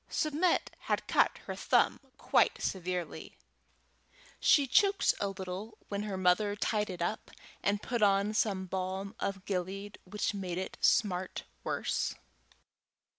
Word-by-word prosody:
Submit 310 Hz, +4 st, +1 dB, 0.2 s
had -, -, +1 dB
cut -, -, +3 dB
her -, -, -4 dB
thumb -, -, +2 dB, 0.2 s
quite -, -, +3 dB
severely. 180 Hz, -2 st, -3 dB, 1.0 s
She 285 Hz, -, +5 dB
choked 395 Hz, -, +4 dB
a 200 Hz, -, 0 dB
little 195 Hz, +3 st, -6 dB
when 200 Hz, 0 st, -2 dB
her 190 Hz, -, -3 dB
mother 190 Hz, +3 st, +3 dB
tied 210 Hz, 0 st, 0 dB
it 180 Hz, -2 st, -3 dB
up, 215 Hz, +5 st, -3 dB, 0.3 s
and 200 Hz, +1 st, 0 dB
put 240 Hz, -2 st, -2 dB
on 200 Hz, +1 st, +3 dB
some 195 Hz, -3 st, +1 dB
balm 190 Hz, +2 st, -3 dB
of 195 Hz, -1 st, -3 dB
Gilead, 195 Hz, +2 st, -3 dB
which 205 Hz, +3 st, -2 dB
made 185 Hz, -3 st, -4 dB
it 190 Hz, -, -4 dB
smart 185 Hz, -3 st, +2 dB, 0.2 s
worse. -, -, -1 dB
195 Hz, 130 wpm, -32 LUFS, 185-210 Hz, 1.0 s, She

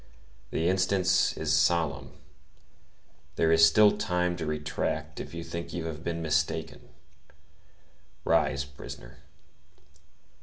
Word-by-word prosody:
The 80 Hz, -, -1 dB
instant 95 Hz, 0 st, +1 dB, 0.3 s
is -, -, 0 dB
solemn; 70 Hz, -6 st, +1 dB, 1.2 s
there 80 Hz, 0 st, +2 dB
is 80 Hz, 0 st, +5 dB
still 105 Hz, +6 st, +6 dB
time 90 Hz, -1 st, 0 dB
to 80 Hz, -, -4 dB
retract 75 Hz, 0 st, -3 dB
if -, -, -7 dB
you 85 Hz, -, -5 dB
think 85 Hz, 0 st, -6 dB
you 85 Hz, -2 st, -4 dB
have 80 Hz, 0 st, -6 dB
been 85 Hz, -1 st, -3 dB
mistaken. 80 Hz, +1 st, -2 dB, 1.4 s
Rise, 70 Hz, 0 st, +2 dB
prisoner. 70 Hz, -3 st, -11 dB
80 Hz, 110 wpm, -28 LUFS, 75-85 Hz, 1.4 s, still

